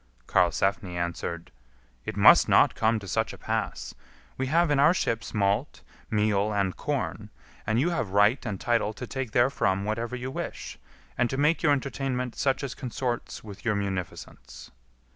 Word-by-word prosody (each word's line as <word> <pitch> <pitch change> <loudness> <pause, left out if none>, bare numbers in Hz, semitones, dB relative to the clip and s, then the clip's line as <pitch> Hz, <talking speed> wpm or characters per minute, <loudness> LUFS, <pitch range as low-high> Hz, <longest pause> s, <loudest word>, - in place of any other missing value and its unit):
Karlsefni 90 +3 +1
answered, 85 -1 -4 0.5
"It - - -5
must - - +7
not - - +5
come 110 +1 +1
to 100 -2 -8
such 85 - -1
a - - -10
pass; - - -3 0.4
we 130 - -2
have 165 +3 +2
in 145 - +3
our 150 +6 +5
ships 115 -8 -2
malt, 105 +7 0 0.3
meal, 105 -2 +1
and 100 -3 0
corn, 130 -7 -3 0.4
and 110 +2 +2
you 170 +7 +2
have 145 - -2
right 105 +6 +3
and 100 -3 -4
title 115 -3 0
to 125 - -7
take 130 0 -4
therefrom 105 -5 +1
whatever 115 +3 -2
you 125 +1 -5
wish, - - -6 0.4
and 125 -1 +2
to 135 - -3
make 150 +4 +2
your 150 - +3
entertainment 135 -3 -2
such 135 0 0
as 135 - -3
consorts 125 -1 -4
with 100 -3 -11
your 110 -2 +1
munificence." 90 -10 -6
115 Hz, 165 wpm, -27 LUFS, 100-135 Hz, 0.5 s, must